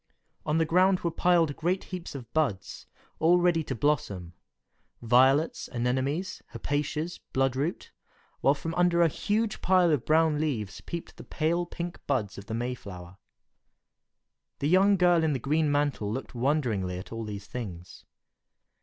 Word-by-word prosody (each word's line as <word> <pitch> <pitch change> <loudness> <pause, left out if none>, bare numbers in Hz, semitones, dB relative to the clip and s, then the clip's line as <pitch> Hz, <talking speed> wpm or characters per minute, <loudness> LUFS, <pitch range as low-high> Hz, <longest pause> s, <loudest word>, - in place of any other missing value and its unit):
On 150 +1 +2
the 165 - +3
ground 185 +3 +3
were 170 - -1
piled 165 -4 +2
great 180 +4 -1
heaps 180 -5 -7
of 120 -4 -9
buds, 140 -12 -2 0.3
all 170 +3 +5
ready 175 -2 +2
to 135 - -3
blossom; 105 - -1 0.7
violets, 130 +6 +3
anemones, 130 +8 -1
hepaticas, 150 +4 -2
blood 135 -1 +1
root, 145 +6 -3 0.5
while 140 - +3
from 165 +3 -5
under 175 0 +3
a - - +5
huge 210 +7 -1
pile 180 -2 +4
of 145 -6 +1
brown 155 -1 +3
leaves 110 -11 -3
peeped 170 -1 -7
the - - -9
pale 170 +2 -1
pink 175 0 -6
buds 110 -9 -1
of 100 - -12
the 110 - -3
Mayflower. 100 -7 -6 1.4
The 145 - -1
young 195 +3 +5
girl 175 -2 +4
in 155 -2 +2
the - - 0
green 150 +4 +1
mantle 145 -8 0
looked 130 +5 -5
wonderingly 120 -9 0
at 90 - -9
all 115 0 -4
these 100 -2 -6
things. 90 -8 -8
145 Hz, 155 wpm, -28 LUFS, 120-170 Hz, 1.4 s, all